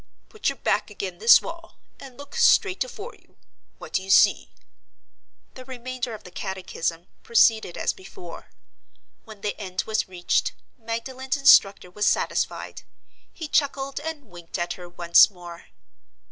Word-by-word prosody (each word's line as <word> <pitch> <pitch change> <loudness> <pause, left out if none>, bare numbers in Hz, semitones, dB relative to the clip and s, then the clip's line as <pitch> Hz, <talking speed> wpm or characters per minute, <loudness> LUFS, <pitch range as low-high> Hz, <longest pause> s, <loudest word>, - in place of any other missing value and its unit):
Put 435 - -2
your 275 - -4
back 215 - -1
ag'in 195 -3 -6
this 225 +2 +7
wall, 335 0 -9 0.2
and 260 -2 -12
look 285 0 -11
straight 390 -3 +4
afore 485 -2 -9
you. - - -26 0.4
What - - -12
do - - +1
you 190 - -11
see?" - - +4 1.0
The 255 - -11
remainder 255 -2 -6
of 215 - -13
the 180 - -13
catechism 180 -3 -4 0.2
proceeded 225 -5 +3
as - - 0
before. 180 -2 -12 0.8
When 215 -2 -13
the 205 - -3
end 185 -2 -3
was 220 -1 -1
reached, 175 -1 0 0.2
Magdalen's 255 +4 -4
instructor 195 -9 +5
was 210 +3 -1
satisfied. - - -1 0.5
He 320 - -7
chuckled 275 -2 0
and 305 -1 -6
winked 175 -5 -9
at 175 0 -2
her 175 -1 -11
once 175 +2 +5
more. 175 -3 -12
220 Hz, 145 wpm, -24 LUFS, 180-270 Hz, 1.0 s, this